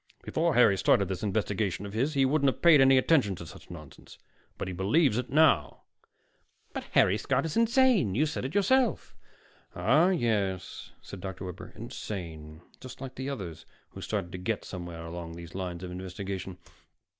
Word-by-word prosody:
Before 165 -1 0
Harry 100 -6 +5
started 100 - +3
this 95 - -4
investigation 100 -2 -1
of 100 - -8
his, 135 +7 0
he 135 -1 +4
wouldn't 140 0 +3
have - - -15
paid 165 -5 +7
any 135 0 +6
attention 130 - +3
to 85 - -9
such 80 - -13
nonsense. 75 -5 -12 0.4
But - - -4
he 95 - -4
believes 110 - +2
it 125 - -5
now." 140 - +3 0.9
"But - - -5
Harry 95 +3 +4
Scott 135 +2 0
is 160 - -4
insane. 230 - +3
You 150 +6 +3
said 155 -3 -4
it 135 +7 -5
yourself." 240 +4 +2 0.6
"Ah, 155 - +4
yes," 105 - -1
said 95 - -9
Dr. 95 0 -6
Webber. 90 +3 -8
"Insane. 85 -9 -7 0.2
Just 130 - -10
like 130 -1 -7
the 130 +2 -5
others 95 - -7 0.2
who - - -10
started 100 -5 -3
to 90 - -6
get 100 +3 -3
somewhere 85 -3 -7
along 85 0 -7
those 85 0 -10
lines 90 -2 -5
of 90 - -6
investigation. 95 0 -6
105 Hz, 175 wpm, -28 LUFS, 90-135 Hz, 0.9 s, paid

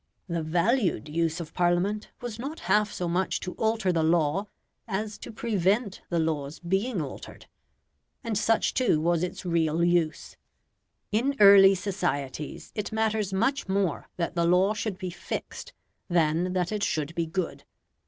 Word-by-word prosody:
The 170 -2 -2
VALUED 175 - +1
use 165 +1 0
of 165 -3 -7
Parliament 180 +4 +1
was 235 -2 -6
not 285 +6 -5
half 210 0 +2
so 175 - -3
much 180 +2 0
to 180 - -5
alter 220 -4 +1
the 165 - +1
law, 165 +4 +2 0.4
as 210 +2 -3
to - - -8
prevent 210 -1 0
the 170 - 0
laws 155 -3 -1
being 195 +5 -1
altered. 135 - -9 0.8
And 230 -2 -2
such 225 +2 +2
too 245 -12 +2
was 170 +1 +1
its 180 +1 -4
real 165 -1 +1
use. 170 -2 0 0.7
In 250 +6 +1
early 195 -1 +8
societies 175 -7 -3
it 210 +1 -4
matters 220 -2 0
much 230 +5 0
more 190 -5 0
that 170 -2 -2
the 170 -1 +1
law 185 +4 +4
should 215 -3 -3
be 185 -1 -5
fixed 340 - -6 0.4
than 170 +1 +2
that 180 0 0
it 210 -1 -2
should 155 -5 -1
be 170 -1 -1
good. 170 +1 -3
185 Hz, 155 wpm, -27 LUFS, 170-210 Hz, 0.8 s, early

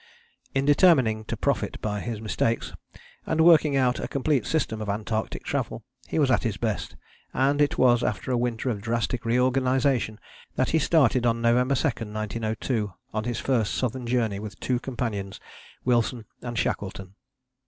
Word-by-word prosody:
" - - -37
In 135 0 +2
determining 135 - +4
to - - -4
profit - - -1
by 105 -1 -2
his 115 0 -4
mistakes, 110 +1 -1 0.5
and 160 - 0
working 160 -3 +6
out 125 -2 +2
a - - -3
complete 140 +1 0
system 120 -9 -1
of 105 - -4
Antarctic 110 +1 -2
travel, - - -3 0.2
he - - -3
was 140 -4 +3
at - - +3
his 110 -4 -2
best; 110 -4 -3 0.4
and 140 +2 +2
it 145 - +2
was 120 -2 +4
after 130 - -2
a - - +2
winter 120 +1 -1
of 105 -3 -4
drastic 115 +1 -2
reorganization 125 -1 +1 0.4
that - - +1
he 160 - +3
started 140 -6 +3
on 115 0 +1
November 125 +3 +3
2, - - -1
1902, 110 0 -3 0.2
on 110 0 -2
his 120 -1 -2
first 120 -6 0
southern 125 -1 -2
journey 115 -5 0
with 105 0 -8
two 125 -2 0
companions, 115 -6 -4 0.5
Wilson 120 -1 +1 0.2
and 120 -1 -5
Shackleton. 95 -3 -3
120 Hz, 165 wpm, -26 LUFS, 110-130 Hz, 0.5 s, working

